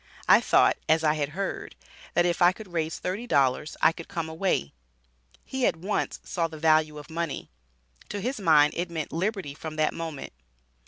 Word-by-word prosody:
I - - +7
thought, - - +4
as 160 +1 +4
I 150 -1 +4
had 145 -2 -1
heard, 195 - -4 0.4
that - - +4
if 175 0 0
I 175 +1 +6
could 190 -3 -12
raise 160 -1 -1
thirty 205 +7 -4
dollars 140 - +1
I - - +7
could 165 0 -10
come 165 -4 -3
away." 160 - -1 0.7
He 265 -1 -3
at - - +1
once 190 +6 -2
saw 170 -2 -1
the 160 -1 -10
value 155 -1 +3
of 145 - -9
money. 165 - -4 0.6
To 205 - -4
his 250 +4 -3
mind 155 -6 +5
it 175 +1 -2
meant 160 -3 -5
liberty 185 -3 -2
from 155 +1 -7
that 155 0 +1
moment. 160 - -6
165 Hz, 190 wpm, -27 LUFS, 155-185 Hz, 0.7 s, I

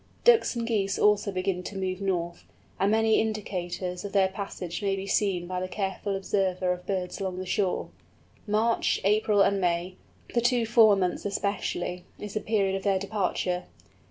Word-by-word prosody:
Ducks 470 - +5
and 235 -1 -2
Geese 200 -4 0
also 210 -1 +3
begin 185 -1 -1
to 195 +2 -7
move 185 0 -2
north, 175 -3 -2 0.4
and 195 - +3
many 220 0 +3
indications 185 -4 -3
of 205 - -6
their 195 -2 +4
passage 185 -3 -5
may 195 -1 +1
be 195 0 -5
seen 195 -3 +1
by 180 +1 -3
the 185 - -2
careful 195 +1 -3
observer 190 -2 0
of 180 0 -10
birds 185 -1 -2
along 185 -2 -3
the 185 - -4
shore. 185 0 -1 0.6
March, 220 +2 +2
April, 210 0 +4
and 195 0 +2
May, 175 +1 -1 0.4
the 235 - +2
two 240 -1 +2
former 220 -3 +5
months 175 - -6
especially, 200 -3 -2
is 210 -1 -7
the 215 - 0
period 200 -3 +1
of 195 - -2
their 195 -1 +2
departure. 190 -2 -1
195 Hz, 175 wpm, -27 LUFS, 185-210 Hz, 0.6 s, Ducks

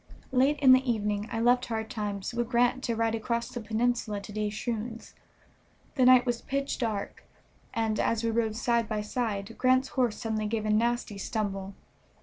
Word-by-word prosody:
Late 270 +3 +3
in 265 -2 +7
the 260 0 +5
evening 210 -1 -2
I 225 - -2
left 245 +2 +3
Hard 220 0 -3
Times 205 -2 -4
with 240 0 -2
Grant 245 +1 +2
to 235 - -1
ride 225 0 +1
across 235 +1 -2
the 240 - -6
peninsula 225 -1 -1
to 200 - -10
De 210 0 -1
Shroon's. 225 +1 -5 0.8
The 260 -3 +3
night 255 0 +7
was 240 -2 -1
pitch 275 +1 -2
dark, 220 -5 -3 0.5
and, 220 -2 -1
as 230 0 +1
we 230 - +1
rode 225 -1 0
side 235 -1 +1
by 215 -1 -1
side, 210 -2 -3
Grant's 255 +1 +3
horse 245 -5 0
suddenly 215 -1 -2
gave 215 0 -2
a 215 - +1
nasty 230 -2 0
stumble. 195 -2 -3
230 Hz, 180 wpm, -28 LUFS, 215-245 Hz, 0.8 s, in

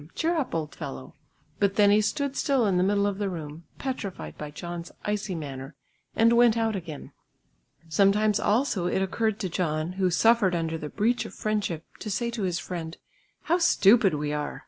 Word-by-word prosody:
cheer 335 +2 +1
up 295 - -2
old 155 -2 -3
fellow!" 65 0 -7 0.5
But 200 -1 +2
then 205 -1 +5
he 210 +1 +5
stood 280 +5 -1
still 270 -5 +2
in 190 -3 +2
the 180 - +3
middle 200 +1 +2
of 200 -1 -1
the 200 -1 -1
room, 160 -2 -7
petrified 195 - -5
by 150 - -7
John's 170 +3 -7
icy 210 -2 -2
manner, 135 -2 -7 0.4
and 230 +1 +5
went 235 -1 +5
out 225 -1 +1
again. 160 -6 -7 0.8
Sometimes 200 +5 +3
also 210 -5 +1
it 190 +1 +1
occurred 220 +3 -1
to 190 - -1
John, 160 -2 -1
who 185 - +3
suffered 205 0 +3
under 165 -1 -2
the 150 - -5
breach 230 +6 +1
of - - -9
friendship 205 -7 -2
to 215 - -5
say 235 +4 -1
to 235 -2 -4
his 180 -3 0
friend, 165 -3 -6 0.5
"How 345 +2 +2
stupid 210 - +5
we 150 0 -2
are!" 150 0 -3
195 Hz, 190 wpm, -26 LUFS, 165-220 Hz, 0.8 s, then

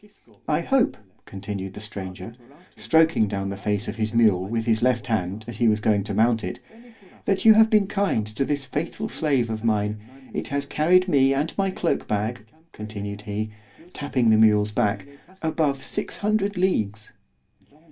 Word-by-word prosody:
I - - +1
hope, 270 -3 +1 0.3
continued 95 -1 -6
the - - -7
stranger, 95 -1 -7 0.4
stroking 160 -8 +3
down 100 -1 -3
the 100 - -4
face 105 +1 -2
of 110 - -5
his 110 0 -2
mule 105 -6 +4
with 115 +1 -2
his 110 -2 +1
left 125 -1 +1
hand 110 -2 -2
as 120 -3 -7
he 120 - +2
was 105 -1 +3
going 105 -1 +2
to 105 - -4
mount 115 +1 +2
it, 90 - -5 0.7
that 195 +1 0
you 220 - +10
have 220 +1 +5
been 215 -2 +4
kind 195 - 0
to 110 +5 -3
this 140 0 -2
faithful 165 +10 -4
slave 135 - 0
of 110 0 -4
mine—it 110 +4 -3
has 140 0 -2
carried 180 +6 +3
me 135 -5 +3
and 150 +4 -2
my 195 -1 +1
cloak 180 -2 -1
bag, 110 +1 -2 0.2
continued 105 -1 -7
he, 105 +1 -4 0.4
tapping 130 -5 +1
the 110 - +5
mule's 105 -1 +4
back, 100 -1 0 0.4
above 155 -4 0
six 210 - -3
hundred 205 -1 0
leagues. 110 - -1
115 Hz, 170 wpm, -24 LUFS, 105-150 Hz, 0.7 s, you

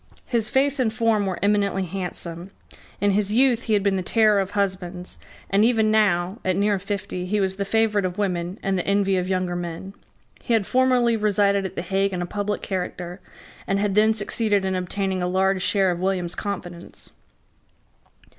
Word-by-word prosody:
His 230 -3 -1
face 275 +2 +2
and 235 -4 +2
form 220 -2 +1
were 185 - -2
eminently 200 -2 +2
handsome. 180 -1 -5 0.5
In 205 0 +2
his 205 0 +1
youth 245 +1 +3
he 220 - 0
had 205 -2 +2
been 200 -1 +2
the - - -1
terror 215 +2 +3
of 195 0 -2
husbands; 185 -2 -3 0.3
and 200 +2 +4
even 220 -2 +3
now, 195 -2 +2
at 185 -1 +1
near 200 0 +1
fifty, 190 -2 -4
he 210 +3 0
was 190 -1 -1
the 200 - -2
favourite 215 -1 +1
of 185 -1 -3
women 180 -2 -2
and 195 -1 0
the - - -4
envy 200 -1 +2
of 180 0 -1
younger 185 -2 -1
men. 175 +2 -6 0.5
He 235 - -2
had 220 -3 +2
formerly 250 -1 +3
resided 200 -2 +2
at - - -13
the - - -3
Hague 195 +1 0
in 180 - -2
a - - -3
public 205 +3 -3
character, 180 -1 -4 0.5
and 195 - +1
had 200 0 0
then 215 +2 +4
succeeded 205 -1 0
in 190 - 0
obtaining 185 +1 -2
a 180 - 0
large 190 +1 +1
share 190 -1 +2
of 175 0 -4
William's 185 -2 -1
confidence. 175 -4 -6
195 Hz, 190 wpm, -23 LUFS, 185-210 Hz, 0.5 s, and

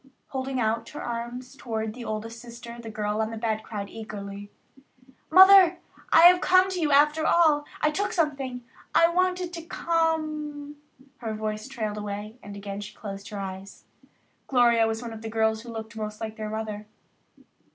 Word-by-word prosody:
Holding 265 -1 -3
out 225 0 0
her 295 - -7
arms 240 +2 -5
toward 220 -4 -4
the 245 +1 -8
oldest 225 +1 -5
sister, 235 0 -10
the 225 - -8
girl 210 0 -2
on 220 - -1
the 225 - -6
bed 220 -1 -1
cried 205 -2 -6
eagerly: 205 -1 -8 0.8
"Mother, 375 0 +8 0.3
I - - +7
have 355 +1 +8
come 370 +1 +4
to 365 - -2
you 300 -2 +1
after 300 +2 +4
all. 310 -4 +4 0.2
I 305 - +3
took 405 +6 -1
something. 275 -7 -1 0.3
I 335 - +6
wanted 365 0 0
to 335 - -5
come 310 -3 -2 0.2
" 265 +1 -26
Her 225 -3 -4
voice 215 +1 -4
trailed 220 -6 -4
away 210 +3 -6
and 205 0 -9
again 200 0 -6
she 210 +1 -9
closed 200 -1 -7
her 210 - -6
eyes. 195 0 -7 0.6
Gloria 235 -3 +4
was 225 +1 -2
the - - -8
one 230 - -6
of 220 - -9
the 225 - -5
girls 220 0 +1
who 240 - -11
looked 225 0 -7
most 215 -1 -5
like 220 -1 -5
their 215 -1 -5
mother. 215 -1 -5
230 Hz, 185 wpm, -26 LUFS, 215-295 Hz, 0.8 s, Mother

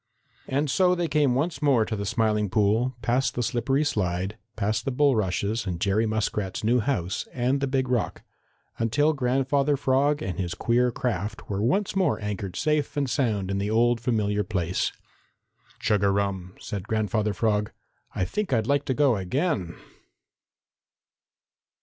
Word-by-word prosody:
And 140 +3 0
so 180 +5 +3
they 175 -1 -1
came 145 -4 +2
once 160 +6 -1
more 135 -7 +3
to 110 - -3
the 100 -1 -4
Smiling 110 -2 +1
Pool, 110 +6 +2
past 125 +2 +1
the 120 - 0
slippery 125 +5 +1
slide, 95 -7 -1 0.2
past 110 0 -1
the - - -1
bulrushes 110 -5 +1
and 90 -2 -3
Jerry 100 +4 +1
Muskrat's 105 -3 -2
new 120 +3 +3
house 105 -7 -1
and 130 +2 0
the 140 - +1
Big 130 -1 0
Rock, 125 -3 -1 0.6
until 145 +7 +2
Grandfather 135 +2 +1
Frog 140 +2 +2
and 95 -1 -4
his 90 -1 -2
queer 125 +1 +2
craft 105 -5 -3
were 100 0 -1
once 190 - +1
more 185 -6 +2
anchored 100 -3 -4
safe 150 -1 0
and 140 -1 +1
sound 110 -8 0
in 100 - -1
the 100 +1 -1
old 115 +1 +2
familiar 105 -4 0
place. 90 -2 -1 0.9
"Chug 105 -2 +1
a 100 - +4
rum!" 95 -2 -1
said 100 -1 -6
Grandfather 110 -1 0
Frog. 105 0 0 0.4
"I 95 - 0
think 210 - -3
I'd 115 -4 +2
like 140 +2 +1
to 130 - -1
go 140 -5 +3
again." 95 - -1
115 Hz, 160 wpm, -26 LUFS, 100-135 Hz, 0.9 s, a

